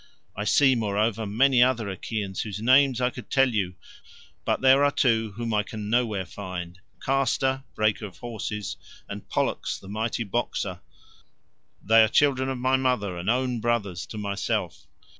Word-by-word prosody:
I 105 - -3
see, 135 +4 +5
moreover, 110 -1 0
many 125 +4 +3
other 120 -4 +3
Achaeans 100 0 -4
whose 105 -2 -5
names 130 +2 +4
I 125 0 +1
could 125 -3 -10
tell 135 -1 +4
you, 95 -4 -1 0.7
but - - 0
there 135 +1 +6
are 145 - +5
two 115 -6 +1
whom 115 +1 -3
I 105 - +3
can 105 0 -6
nowhere 110 -6 +1
find, 90 -2 -7 0.3
Castor, 135 0 +1
breaker 110 0 0
of 90 -4 -15
horses, 105 -1 -5 0.3
and - - -8
Pollux - - -1
the - - -14
mighty 110 +3 -2
boxer; 100 -4 -3 1.0
they 115 +2 +6
are - - +4
children 130 0 +2
of 135 - -2
my 130 +1 +2
mother, 125 -8 0
and 90 +4 -3
own 125 0 0
brothers 100 -7 -1
to 110 - -8
myself. 100 -1 -3
115 Hz, 160 wpm, -26 LUFS, 100-130 Hz, 1.0 s, there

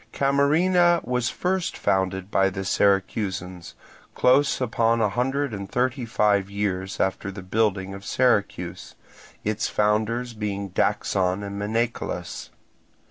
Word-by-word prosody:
Camarina 170 +6 +3
was 125 -1 0
first 185 0 -2
founded 95 0 0
by 95 0 +3
the 95 0 -5
Syracusans, 95 -2 0 0.4
close 135 +3 +3
upon 115 -2 +1
a 110 -2 +2
hundred 135 +4 -1
and 100 -1 -6
thirty 125 0 0
five 105 -3 +2
years 95 -2 -3
after 95 +1 -1
the 95 -1 -9
building 95 -1 0
of 100 0 -9
Syracuse; 100 -9 0 0.5
its 110 +1 -1
founders 110 +3 0
being 100 -2 -4
Daxon 95 +1 0
and 100 0 -5
Menecolus. 110 -5 -3
105 Hz, 120 wpm, -24 LUFS, 95-125 Hz, 0.5 s, Camarina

